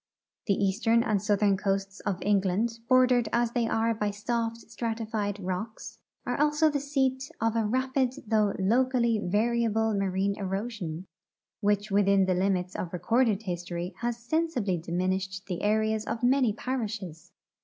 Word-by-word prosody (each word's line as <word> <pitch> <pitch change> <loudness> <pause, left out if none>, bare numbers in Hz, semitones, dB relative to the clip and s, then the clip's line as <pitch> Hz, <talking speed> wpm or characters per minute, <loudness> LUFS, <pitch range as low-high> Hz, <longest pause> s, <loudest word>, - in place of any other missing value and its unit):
The 200 - +3
east 200 +4 -1
ern 230 +1 +5
and 210 -4 +1
southern 205 -1 +2
coasts 195 0 -2
of 200 -3 -2
England, 205 +3 +1
bordered 250 -3 +4
as 235 -1 +1
the}'' 235 -1 0
are 225 +1 +1
by 210 -1 -1
soft 230 +2 -2
stratified 220 -3 -3
rocks, 190 +4 -5 0.3
are 245 +2 -1
also 300 +1 +3
the 290 - 0
seat 270 -2 -1
of 225 0 0
a 225 -2 +1
rapid 260 +2 0
though 215 -2 +2
locally 235 +2 +2
varia 230 +5 +1
ble 220 +1 +1
marine 195 0 0
erosion, 195 -4 -4 0.5
which 205 0 0
within 200 -1 +4
the 185 - +1
limits 180 -1 0
of 170 - -4
recorded 225 +2 +1
history 175 -1 -4
has 240 -1 -2
sensibly 235 - -1
diminished 185 +3 -2
the 180 -3 -4
areas 215 +1 +1
of 225 +2 -4
many 255 -2 +4
parishes. 210 -8 -5
215 Hz, 150 wpm, -28 LUFS, 195-235 Hz, 0.5 s, ern